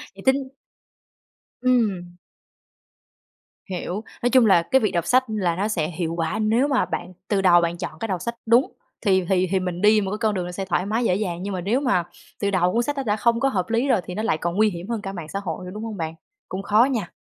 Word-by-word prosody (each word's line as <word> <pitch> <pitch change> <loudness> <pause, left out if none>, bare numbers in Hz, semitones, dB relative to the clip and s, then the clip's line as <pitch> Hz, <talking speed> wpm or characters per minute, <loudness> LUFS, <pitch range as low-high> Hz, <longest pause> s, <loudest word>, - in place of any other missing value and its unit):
Vậy 195 - -12
tính 265 0 +2 1.1
Ừm. 205 -9 +1 1.5
Hiểu. 185 +3 -4 0.2
Nói 245 - +3
chung 250 -1 +5
là 190 -5 +5
cái 265 +10 +2
việc 215 - +1
đọc 170 -2 -1
sách 255 +7 +4
là 190 -6 0
nó 200 +4 0
sẽ 165 -8 -1
hiệu 165 -1 -3
quả 160 +3 -1
nếu 225 +6 +2
mà 270 -3 +2
bạn 180 +1 -5
từ 200 -2 +1
đầu 175 -2 +6
bạn 170 0 -1
chọn 160 -3 -6
cái 225 - -3
đọc 185 -4 -2
sách 235 0 -3
đúng, 235 +4 +4 0.3
thì 190 -4 +2
thì 185 -1 +2
thì 190 - +2
mình 180 0 -4
đi 210 0 +5
một 190 - -3
cái 210 - -2
con 220 -2 +1
đường 180 -2 -2
nó 180 - -5
sẽ 195 +2 -4
thoải 185 0 0
mái 220 +4 0
dễ 180 - +2
dàng, 180 -4 -3
nhưng 200 0 -3
mà 180 - -3
nếu 215 +8 +1
mà 250 -11 +1 0.4
từ 200 -1 0
đầu 180 -1 +2
cuốn 235 - +2
sách 290 +4 -2
nó 275 - -1
đã 210 -4 +1
không 230 +1 +2
có 270 - +2
hợp 190 -5 -2
lý 230 +4 +1
rồi 200 - +3
thì 180 - -6
nó 215 - -2
lại 160 - +1
còn 170 +2 -3
nguy 215 +1 +4
hiểm 175 +1 -7
hơn 230 -3 -2
cả 195 -1 -5
mạng 170 -5 -7
xã 195 - -3
hội, 180 0 -5
đúng 215 - -6
hông 220 -2 -5
bạn? 160 -1 -4 0.3
Cũng 185 - -4
khó 215 +4 +4
nha. 230 -9 -2
200 Hz, 255 wpm, -23 LUFS, 180-230 Hz, 1.5 s, đầu